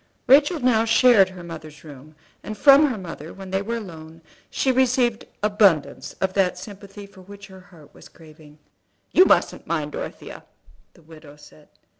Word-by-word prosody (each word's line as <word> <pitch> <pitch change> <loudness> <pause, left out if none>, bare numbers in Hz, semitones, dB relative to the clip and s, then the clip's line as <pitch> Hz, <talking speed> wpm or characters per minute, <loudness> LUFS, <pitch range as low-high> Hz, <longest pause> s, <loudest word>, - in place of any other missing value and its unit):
Rachel 290 +5 +4
now 245 -4 +2
shared 225 -3 +4
her 185 -2 -12
mother's 155 -3 -11
room; 150 0 -14 0.3
and 215 - -8
from 285 +4 +6
her 250 -5 -4
mother, 165 -4 -10
when 195 -1 -11
they 190 0 -1
were 230 +3 -4
alone 160 -7 -10
together, 160 - -29
she 265 - 0
received 250 -3 0 0.2
abundance 205 -7 +1
of 190 -1 -3
that 190 -2 0
sympathy 200 +1 -11
for 200 -1 -17
which 200 +2 -13
her 190 -1 -15
heart 160 -6 -19
was - - -16
craving. 155 -2 -18 0.5
"You 370 - +5
mustn't - - 0
mind - - -3
Dorothea," - - -9 0.5
the 170 - -22
widow 155 -2 -15
said. 150 0 -19
195 Hz, 170 wpm, -22 LUFS, 160-230 Hz, 0.5 s, from